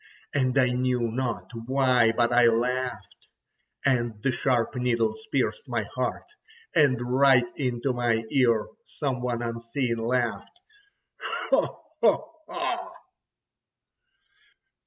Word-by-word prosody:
And 130 -1 +1
I 125 -2 +4
knew 125 -2 0
not 115 -6 -3 0.2
why, 130 -3 +3
but 120 +1 +1
I 120 -1 +6
laughed, 120 -3 -2 0.6
and 120 -4 +1
the 135 - +2
sharp 125 -2 0
needles 125 - -1
pierced 475 - -1
my - - -1
heart, - - -2 0.5
and 135 -5 +4
right 130 +1 +4
into 125 -1 -1
my 120 -2 0
ear 115 -6 +3 0.2
some 135 - -3
one 120 -1 -2
unseen 115 +1 -2
laughed: 120 - -2 0.9
"Ho! - - +1 0.2
ho! 345 +2 -1
125 Hz, 105 wpm, -26 LUFS, 115-135 Hz, 0.9 s, I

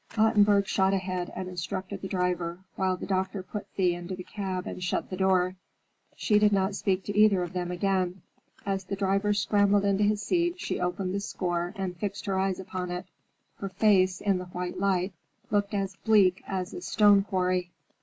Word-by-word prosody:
Ottenburg 210 -2 +4
shot 190 0 +2
ahead 185 -2 -3
and 185 - -4
instructed 185 +2 -5
the 190 - -4
driver, 180 -2 -1 0.2
while 185 -1 0
the - - -6
doctor 190 0 -1
put 205 +2 -6
Thea 180 -2 +2
into 175 +2 -5
the 180 - -8
cab 185 -2 -4
and 180 - -6
shut 180 - -2
the - - -2
door. 185 -1 +2 0.6
She 210 -2 +3
did 210 0 +4
not 195 0 +1
speak 195 -1 0
to 205 - -5
either 205 -3 +5
of 175 - -6
them 180 -1 -2
again. 185 0 -1 0.4
As 195 -1 -1
the 195 +2 -4
driver 195 +1 +1
scrambled 205 0 +3
into 200 +1 +2
his 210 0 +1
seat 345 - 0
she - - -3
opened 180 +1 -2
the 200 - 0
score 175 -3 -2
and 190 -3 -3
fixed 200 +4 -4
her 195 -2 0
eyes 190 -1 0
upon 185 -1 -5
it. 180 0 -4 0.5
Her 195 - -4
face, 190 -2 +3
in 195 -3 +1
the 180 - -6
white 180 0 -5
light, 190 -1 +1 0.4
looked 205 0 +1
as 195 -1 -2
bleak 200 -4 +4
as 185 -1 -3
a - - -6
stone 205 - +5
quarry. 185 -2 0
190 Hz, 195 wpm, -28 LUFS, 180-200 Hz, 0.6 s, either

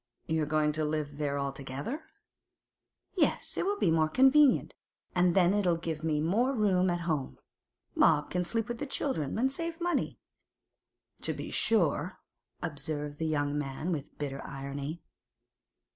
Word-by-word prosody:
'You're 160 -2 0
going 155 0 +2
to 155 +1 0
live 150 -1 -2
there 140 -1 0
altogether?' 140 - -4 1.1
'Yes; - - +1
it'll 405 +2 0
be 170 - +2
more 160 -1 +3
convenient, 270 - +5 0.4
and 180 -1 +3
then 185 -1 +5
it'll 185 -5 +2
give 165 -2 -3
them 155 -2 0
more 230 +11 +2
room 190 -4 +3
at 175 0 -1
home. 155 -6 -2 0.6
Bob 150 -2 +4
can 180 0 +1
sleep 225 +4 0
with 240 -1 -4
the 290 - -3
children, 240 - -2
and 260 +4 +2
save 335 +3 -4
money.' 350 0 -1 1.0
'To - - -2
be - - -6
sure!' 180 -4 +1 0.5
observed 150 -2 -3
the 160 - 0
young 145 -2 0
man 145 +4 -3
with 150 -4 -4
bitter 135 -2 -4
irony. 140 +4 -5
160 Hz, 145 wpm, -30 LUFS, 145-205 Hz, 1.1 s, convenient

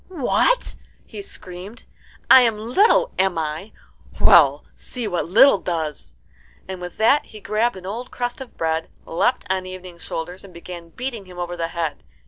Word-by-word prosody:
"What?" 375 - +1 0.3
he 210 -3 -8
screamed. 190 +3 -8 0.4
"I 260 - +9
am 230 -3 +2
little, 400 - +3
am 190 -2 +2
I? 160 +6 -3 0.5
Well, - - +6
see 245 -3 -6
what 175 -3 -2
little 230 +3 +6
does!" 155 - -4 0.5
And 185 -1 -6
with 180 -1 -7
that 250 +7 +4
he 215 - -12
grabbed 215 +3 0
an 185 -1 -10
old 230 +6 -5
crust 245 +2 -4
of 260 - -10
bread, 160 0 -1 0.2
leapt 245 +10 0
on 185 0 -1
Evening's 185 -2 -9
shoulders, 175 +3 -6
and 190 -3 -14
began 170 0 -9
beating 235 +1 -5
him 180 -1 -13
over 175 0 -4
the 165 -1 -2
head. 165 -2 -4
190 Hz, 165 wpm, -22 LUFS, 175-240 Hz, 0.5 s, I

